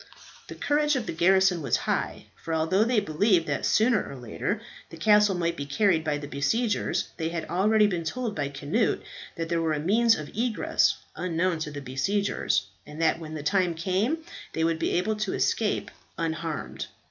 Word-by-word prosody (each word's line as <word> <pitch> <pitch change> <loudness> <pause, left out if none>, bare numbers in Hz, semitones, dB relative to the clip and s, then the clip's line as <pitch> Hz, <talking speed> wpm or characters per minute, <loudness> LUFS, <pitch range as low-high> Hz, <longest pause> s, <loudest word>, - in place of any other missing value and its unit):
The - - -8
courage 295 0 +1
of 250 -4 -1
the - - -4
garrison 185 +1 +4
was 135 -5 +1
high, - - -2 0.2
for 165 - -2
although 165 +6 +2
they 235 -1 +2
believed 185 -1 +2
that - - -1
sooner 220 -1 +3
or 140 - -8
later 120 -4 -3 0.3
the 165 - -10
castle 210 +2 +4
might 170 -1 0
be 140 -3 -5
carried 165 +2 +2
by 150 -2 0
the 145 0 -7
besiegers, 205 - 0
they 160 -1 -1
had 165 -1 -4
already 210 +4 +3
been 180 -5 -1
told 230 +6 -3
by 145 -2 -2
Cnut 150 - 0 0.3
that 165 -1 -3
there 170 0 0
was 160 -2 0
a - - -3
means 225 +8 +4
of 155 +4 -8
egress 230 0 +1 0.2
unknown 175 -1 0
to 155 - -3
the 145 -1 -7
besiegers, 140 - 0 0.2
and 150 +1 -11
that 165 0 +2
when 155 -1 -7
the 150 - -5
time 180 +1 +1
came 190 - 0 0.4
they 160 - 0
would 165 0 +1
be - - 0
able 210 +5 0
to 210 -2 -2
escape 215 -2 0 0.3
unharmed. 160 -1 -3
170 Hz, 190 wpm, -27 LUFS, 155-210 Hz, 0.4 s, garrison